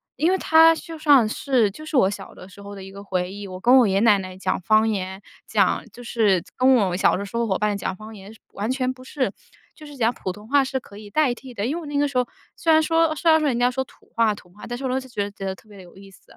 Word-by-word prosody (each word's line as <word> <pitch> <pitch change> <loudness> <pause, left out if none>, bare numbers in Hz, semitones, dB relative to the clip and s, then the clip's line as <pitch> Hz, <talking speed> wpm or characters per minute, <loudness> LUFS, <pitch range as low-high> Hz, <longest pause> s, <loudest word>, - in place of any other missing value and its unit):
因 335 +4 +2
为 380 - +2
它 325 -1 +6
就 330 0 -9
算 290 -7 +5
是 240 -1 +1
就 305 +11 -11
是 310 -2 -1
我 190 -7 +4
小 195 -1 -8
的 185 - -13
时 195 +1 -15
候 200 0 -9
的 195 - -9
一 195 - -10
个 200 - -10
回 180 -2 -2
忆。 205 0 -7
我 185 - -8
跟 245 +7 +5
我 240 - +5
爷 190 - 0
爷 195 - +3
奶 215 -2 +5
奶 185 -1 -8
讲 185 -1 -2
方 215 +5 +3
言， 190 -2 -3 0.2
讲 - - +1
就 245 - -12
是 210 -7 +2
跟 260 +1 +4
我 195 -7 +1
小 185 - +3
的 200 - -4
时 200 +3 -10
候 235 - +1
伙 190 -4 0
伴 210 -1 0
讲 190 - -3
方 215 +2 -11
言 200 +1 -12
是 225 - -19
完 210 +4 -2
全 255 0 -1
不 255 - -15
是， 255 -5 -2 0.4
就 305 - -13
是 290 -1 -11
讲 235 -1 +2
普 190 -5 -5
通 210 +3 -12
话 280 +2 +4
是 265 0 -3
可 200 -4 -15
以 210 -1 -11
代 290 +1 +2
替 255 +1 -12
的。 205 -2 -3
因 275 +6 -1
为 345 - -4
我 - - -9
那 290 - -3
个 290 0 +2
时 275 -3 -4
候 250 - +2 0.3
虽 330 - +1
然 315 0 +6
说 325 0 +2
虽 330 +2 +1
然 315 - +6
说 305 - +1
人 240 - -1
家 245 0 +3
说 265 +1 -2
土 - - -23
话 225 -2 +3
土 180 - -16
话， 205 +3 -12
但 240 - -4
是 270 - -8
我 - - -1
当 260 +1 0
时 260 - -12
就 - - -20
觉 205 -1 -1
得 195 -1 -5
特 215 - -22
别 205 - -14
地 - - -11
有 175 +1 -17
意 195 0 -13
思。 180 - -20
225 Hz, 340 characters per minute, -23 LUFS, 200-265 Hz, 0.4 s, 它